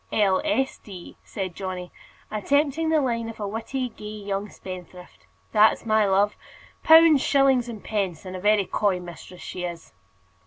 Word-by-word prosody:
"L. 195 Hz, -3 st, +2 dB
S. 270 Hz, -4 st, 0 dB
D.," 185 Hz, -4 st, -11 dB
said 190 Hz, -3 st, -5 dB
Johnny, 185 Hz, -1 st, -6 dB, 0.4 s
attempting 285 Hz, +8 st, +1 dB
the 320 Hz, -1 st, +3 dB
line 230 Hz, -3 st, -1 dB
of 225 Hz, -, -10 dB
a 205 Hz, -, -3 dB
witty, 245 Hz, +5 st, -3 dB
gay 220 Hz, -, -15 dB
young 205 Hz, -1 st, -4 dB
spendthrift. 180 Hz, -1 st, -11 dB, 0.2 s
"That's 215 Hz, +1 st, +4 dB
my 215 Hz, -2 st, +3 dB
love 200 Hz, +2 st, +2 dB, 0.5 s
pounds, 320 Hz, -3 st, +7 dB
shillings, 270 Hz, -4 st, +3 dB
and 220 Hz, -3 st, -8 dB
pence; 195 Hz, -6 st, -3 dB
and 185 Hz, 0 st, -7 dB
a -, -, -5 dB
very 205 Hz, +1 st, +3 dB
coy 195 Hz, -1 st, 0 dB
mistress 175 Hz, +1 st, -11 dB
she 180 Hz, -, -6 dB
is." 170 Hz, -, -7 dB
210 Hz, 160 wpm, -24 LUFS, 185-250 Hz, 0.5 s, pounds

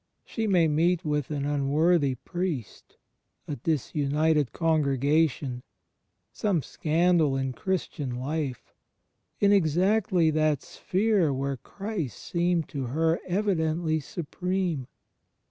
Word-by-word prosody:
She 225 Hz, -2 st, -3 dB
may 175 Hz, -5 st, +4 dB
meet 165 Hz, +3 st, +1 dB
with 150 Hz, -2 st, -1 dB
an 145 Hz, -2 st, -2 dB
unworthy 145 Hz, +1 st, +2 dB
priest, 170 Hz, -, -5 dB, 0.5 s
a 145 Hz, -, -4 dB
disunited 150 Hz, +1 st, +1 dB
congregation, 145 Hz, -4 st, +1 dB, 0.7 s
some 185 Hz, -, 0 dB
scandal 160 Hz, -3 st, +2 dB
in 135 Hz, -1 st, -2 dB
Christian 150 Hz, -7 st, -3 dB
life, 135 Hz, 0 st, -4 dB, 0.7 s
in 200 Hz, 0 st, +4 dB
exactly 185 Hz, 0 st, +3 dB
that 155 Hz, -2 st, +1 dB
sphere 195 Hz, -5 st, +1 dB
where 135 Hz, 0 st, -2 dB
Christ 195 Hz, -, -5 dB
seemed 170 Hz, -1 st, 0 dB
to 135 Hz, -3 st, -4 dB
her 160 Hz, +6 st, +1 dB
evidently 170 Hz, -4 st, 0 dB
supreme. 175 Hz, -1 st, -3 dB
160 Hz, 100 wpm, -27 LUFS, 140-180 Hz, 0.7 s, may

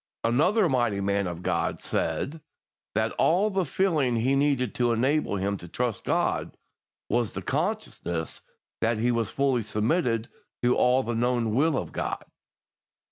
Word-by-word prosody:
Another 175 Hz, -, +3 dB
mighty 120 Hz, -8 st, +1 dB
man 100 Hz, 0 st, 0 dB
of 85 Hz, 0 st, -6 dB
God -, -, 0 dB
said 155 Hz, +3 st, -2 dB, 0.5 s
that -, -, +1 dB
all 195 Hz, +6 st, +3 dB
the 190 Hz, -2 st, +1 dB
feeling 150 Hz, -8 st, +1 dB
he 125 Hz, +4 st, +2 dB
needed 135 Hz, -4 st, +1 dB
to 120 Hz, -1 st, +1 dB
enable 130 Hz, +1 st, +1 dB
him 100 Hz, +1 st, -1 dB
to 85 Hz, -, -10 dB
trust 120 Hz, +5 st, -2 dB
God -, -, 0 dB, 0.5 s
was 120 Hz, -1 st, 0 dB
the -, -, -5 dB
consciousness 80 Hz, -2 st, -2 dB, 0.4 s
that 115 Hz, 0 st, +1 dB
he 120 Hz, +3 st, +2 dB
was 115 Hz, -2 st, 0 dB
fully 135 Hz, -3 st, +1 dB
submitted 115 Hz, -, 0 dB, 0.4 s
to 120 Hz, 0 st, +4 dB
all 125 Hz, +1 st, +3 dB
the 120 Hz, -, -2 dB
known 120 Hz, -1 st, +1 dB
will 145 Hz, +4 st, +3 dB
of -, -, -4 dB
God. -, -, -3 dB
120 Hz, 150 wpm, -27 LUFS, 110-140 Hz, 0.5 s, to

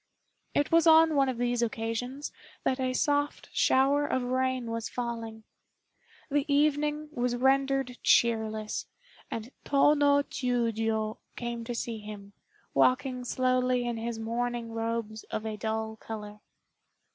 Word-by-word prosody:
It 290 Hz, -, +1 dB
was 330 Hz, 0 st, +5 dB
on 320 Hz, 0 st, +7 dB
one 275 Hz, -2 st, +3 dB
of 255 Hz, -, -3 dB
these 245 Hz, 0 st, 0 dB
occasions 235 Hz, +4 st, -3 dB, 0.3 s
that 260 Hz, -, 0 dB
a 255 Hz, -1 st, 0 dB
soft 290 Hz, +3 st, 0 dB
shower 275 Hz, +2 st, +3 dB
of 260 Hz, -, 0 dB
rain 255 Hz, -1 st, -1 dB
was 230 Hz, 0 st, -3 dB
falling. 230 Hz, -2 st, -5 dB, 0.9 s
The 290 Hz, 0 st, +1 dB
evening 300 Hz, +1 st, +2 dB
was 245 Hz, -4 st, -1 dB
rendered 270 Hz, 0 st, +1 dB
cheerless, 220 Hz, -2 st, +2 dB, 0.4 s
and 230 Hz, +3 st, -5 dB
Tô 285 Hz, +1 st, +4 dB
no 285 Hz, -1 st, +4 dB
Chiûjiô 225 Hz, -4 st, -1 dB, 0.2 s
came 235 Hz, -1 st, -4 dB
to 240 Hz, 0 st, -4 dB
see 230 Hz, -1 st, -3 dB
him, 205 Hz, -1 st, -9 dB, 0.4 s
walking 255 Hz, -1 st, +2 dB
slowly 255 Hz, 0 st, +1 dB
in 240 Hz, -1 st, -2 dB
his 230 Hz, 0 st, -3 dB
mourning 235 Hz, +1 st, -2 dB
robes 225 Hz, -1 st, -3 dB
of 215 Hz, -, -4 dB
a 220 Hz, -1 st, -3 dB
dull 220 Hz, +1 st, -3 dB
color. 210 Hz, -1 st, -8 dB
245 Hz, 135 wpm, -29 LUFS, 225-270 Hz, 0.9 s, on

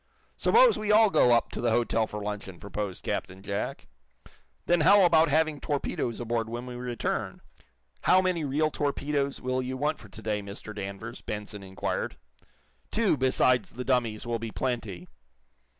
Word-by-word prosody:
"Suppose 485 Hz, 0 st, +5 dB
we 210 Hz, 0 st, 0 dB
all 215 Hz, -1 st, +6 dB
go 125 Hz, -, +5 dB
up 120 Hz, -1 st, +3 dB
to -, -, -4 dB
the 120 Hz, -, +2 dB
hotel 115 Hz, -1 st, +1 dB
for 105 Hz, -1 st, -6 dB
luncheon!" 100 Hz, -3 st, -5 dB
proposed 100 Hz, -1 st, -5 dB
Captain 95 Hz, +1 st, -4 dB
Jack. 100 Hz, +1 st, -4 dB, 0.8 s
"Then 175 Hz, -1 st, +3 dB
how 195 Hz, +4 st, +7 dB
about 165 Hz, -2 st, +5 dB
having 155 Hz, 0 st, +2 dB
torpedoes 140 Hz, -5 st, -2 dB
aboard 115 Hz, -1 st, -2 dB
when 120 Hz, +2 st, -5 dB
we 125 Hz, -, -7 dB
return?" 120 Hz, -1 st, -3 dB, 0.7 s
"How 185 Hz, -, +6 dB
many 185 Hz, -3 st, 0 dB
real 150 Hz, +2 st, +1 dB
torpedoes 140 Hz, -1 st, -1 dB
will 130 Hz, 0 st, -1 dB
you 130 Hz, +1 st, -4 dB
want 150 Hz, +3 st, -1 dB
for 105 Hz, -, -13 dB
to 105 Hz, -, -11 dB
day, 105 Hz, -1 st, -1 dB
Mr. 100 Hz, +2 st, -8 dB
Danvers?" 100 Hz, +4 st, -6 dB
Benson 105 Hz, -1 st, -6 dB
inquired. 95 Hz, -9 st, -3 dB, 0.7 s
"Two, 215 Hz, -6 st, +2 dB
besides 130 Hz, -2 st, +2 dB
the 125 Hz, +2 st, -6 dB
dummies, 120 Hz, -4 st, 0 dB
will 120 Hz, -1 st, -2 dB
be 115 Hz, 0 st, -4 dB
plenty." 110 Hz, -8 st, -3 dB
120 Hz, 165 wpm, -28 LUFS, 105-150 Hz, 0.8 s, how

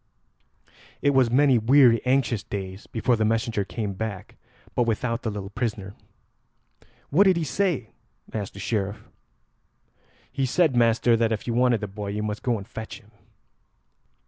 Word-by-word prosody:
It 145 Hz, -, +4 dB
was 130 Hz, -3 st, +3 dB
many 130 Hz, 0 st, +4 dB
weary 120 Hz, 0 st, +5 dB
anxious 125 Hz, -5 st, +2 dB
days 95 Hz, 0 st, -7 dB
before 120 Hz, +2 st, +1 dB
the 110 Hz, -, 0 dB
messenger 110 Hz, -1 st, 0 dB
came 100 Hz, +2 st, -4 dB
back, 105 Hz, -1 st, -6 dB, 0.4 s
but 120 Hz, -, +1 dB
without 115 Hz, +2 st, -1 dB
the 115 Hz, -, -2 dB
little 100 Hz, -1 st, -6 dB
prisoner. 105 Hz, -4 st, -3 dB, 1.2 s
"What 185 Hz, +8 st, +5 dB
did 190 Hz, -3 st, +4 dB
he 170 Hz, -, 0 dB
say?" 155 Hz, -, -1 dB, 0.4 s
asked 105 Hz, -4 st, -4 dB
the -, -, -8 dB
Sheriff. 100 Hz, -1 st, -3 dB, 1.2 s
"He 135 Hz, -1 st, -1 dB
said, 155 Hz, 0 st, +2 dB
master, 115 Hz, 0 st, +3 dB
that 115 Hz, 0 st, +1 dB
if 110 Hz, -, -2 dB
you 120 Hz, -, -2 dB
wanted 120 Hz, -2 st, +2 dB
the 105 Hz, -, -3 dB
boy 100 Hz, +1 st, -7 dB
you 105 Hz, +1 st, -3 dB
must 105 Hz, -1 st, -3 dB
go 120 Hz, -3 st, 0 dB
and 100 Hz, -1 st, -9 dB
fetch 110 Hz, 0 st, -8 dB
him." 110 Hz, -2 st, -23 dB
115 Hz, 160 wpm, -25 LUFS, 105-125 Hz, 1.2 s, weary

